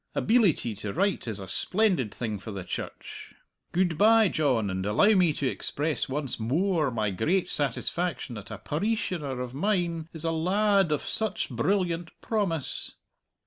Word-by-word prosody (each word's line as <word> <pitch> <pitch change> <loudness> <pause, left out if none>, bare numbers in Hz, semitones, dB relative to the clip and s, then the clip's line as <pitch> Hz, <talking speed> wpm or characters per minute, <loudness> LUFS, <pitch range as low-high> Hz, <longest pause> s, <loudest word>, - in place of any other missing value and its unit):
Abeelity 205 - +3
to 105 -1 -4
write 200 -9 0
is 110 -3 -3
a 95 - -7
splendid 180 - +1
thing 110 -4 -4
for 95 - -9
the 100 -3 -5
Church. - - -7 0.4
Good 175 -3 +1
bye, 220 -1 +6
John, 125 - +1
and 95 0 -2
allow 105 - +4
me 180 -5 +4
to 145 - -3
express 145 +3 -2
once 135 -2 -2
moar 155 - +1
my 110 -4 -1
great 165 - 0
satisfaction 145 +1 -1
that 105 -3 -8
a 110 - -6
pareeshioner 155 - -2
of 125 -1 -5
mine 170 -1 -1
is 160 -1 -9
a 165 - 0
la 200 +5 +2
ad 180 -5 +2
of 150 - 0
such 215 -9 -1
brilliant 170 - -1
promise!" 190 - -2
160 Hz, 160 wpm, -27 LUFS, 120-190 Hz, 0.4 s, bye